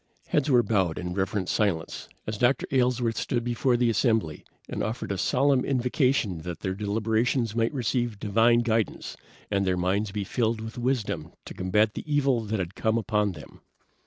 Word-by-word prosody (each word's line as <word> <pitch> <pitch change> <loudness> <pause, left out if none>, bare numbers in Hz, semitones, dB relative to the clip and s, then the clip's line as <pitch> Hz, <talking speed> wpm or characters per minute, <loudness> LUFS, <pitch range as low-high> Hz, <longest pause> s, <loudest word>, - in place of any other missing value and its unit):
Heads 150 0 +1
were 125 -3 +5
bowed 95 -6 +1
in 90 0 -4
reverent 95 0 -1
silence 95 -7 -1 0.2
as 105 -1 -4
Dr. 125 +1 +2
Aylesworth 125 -3 +1
stood 120 -2 -1
before 120 +1 +1
the 120 -1 +2
assembly 110 - 0 0.2
and - - -4
offered 110 -1 -3
a 100 - -1
solemn 135 +3 +2
invocation 125 - +1
that 85 +1 -7
their 95 - -2
deliberations 110 +3 0
might 115 0 +1
receive 120 -4 -1
divine 115 +3 +3
guidance, 115 -3 -1 0.4
and 100 -1 +2
their 95 -1 +1
minds 100 +4 0
be 105 0 -2
filled 115 +2 0
with 110 +2 -7
wisdom 125 -2 -2
to - - -8
combat 105 +4 +1
the 150 - -7
evil 140 -4 +3
that 110 +1 -1
had 90 -1 -3
come 110 +2 0
upon 105 -2 0
them. 75 - -13
110 Hz, 175 wpm, -26 LUFS, 100-120 Hz, 0.4 s, were